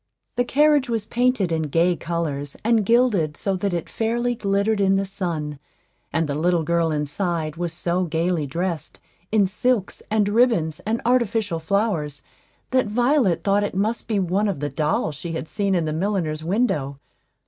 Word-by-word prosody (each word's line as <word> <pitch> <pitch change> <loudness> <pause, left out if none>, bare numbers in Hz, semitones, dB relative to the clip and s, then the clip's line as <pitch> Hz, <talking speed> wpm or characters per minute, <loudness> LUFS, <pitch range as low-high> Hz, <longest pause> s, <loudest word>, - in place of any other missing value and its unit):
The 245 - +2
carriage 290 +1 +3
was 225 -3 -1
painted 245 -7 +1
in 160 -1 +1
gay 170 +4 +3
colors, 155 -5 -3
and 225 -1 +3
gilded 205 -9 +2
so 195 -1 -1
that 200 +2 -1
it 170 -2 -2
fairly 240 +2 -1
glittered 200 -1 0
in 195 0 +4
the 195 0 +1
sun; 165 -7 -3 0.5
and 165 -1 0
the 145 - -2
little 170 +3 +1
girl 170 0 +1
inside 155 +1 -2
was 175 0 -3
so 175 +2 -1
gayly 165 -1 0
dressed, 170 +3 -3 0.3
in 210 -2 +4
silks, 210 +2 0
and 215 -1 +2
ribbons, 205 -8 +2
and 225 +2 -1
artificial 225 -7 +1
flowers, 160 -5 -1 0.5
that 255 -3 +2
Violet 240 - +2
thought 200 0 +2
it 205 - -3
must 215 +5 -1
be 220 -2 0
one 195 +3 +1
of 195 -7 -2
the 145 0 -2
dolls 150 +2 0
she 165 +4 -6
had 160 - -4
seen 200 +1 0
in 165 -3 0
a 155 - -1
milliner's 165 -3 -1
window. 170 - 0
185 Hz, 170 wpm, -23 LUFS, 160-220 Hz, 0.5 s, in